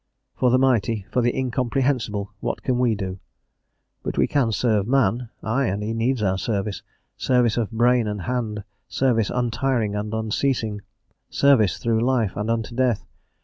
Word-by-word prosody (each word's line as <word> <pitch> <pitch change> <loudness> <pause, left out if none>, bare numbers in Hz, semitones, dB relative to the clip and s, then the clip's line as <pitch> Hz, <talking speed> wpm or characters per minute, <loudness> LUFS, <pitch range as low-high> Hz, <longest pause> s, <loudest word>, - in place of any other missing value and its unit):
For 125 - +2
the 125 - +4
Mighty, 115 -5 +1
for 125 - +2
the 120 +1 0
Incomprehensible, 125 -5 -1
what - - -3
can 125 -1 0
we 120 -3 +2
do? 95 -2 -5 0.8
But - - -4
we - - +4
can 130 -6 +1
serve 110 -2 +1
man, 120 -2 +1
ay, 130 +5 +1
and 100 +1 -2
he 110 +2 -2
needs 115 +1 0
our 95 -1 +1
service; 100 0 -2 0.4
service 125 -3 +2
of 115 -4 -1
brain 120 0 +2
and 105 -2 -3
hand, 115 -4 -2 0.2
service 115 -5 +1
untiring 120 -2 0
and 105 +1 -3
unceasing, 110 -1 -1 0.5
service 120 -10 +3
through 115 -1 0
life 120 -5 +1
and 105 +2 -3
unto 115 0 -1
death. 125 -4 +1
115 Hz, 160 wpm, -23 LUFS, 105-125 Hz, 0.8 s, the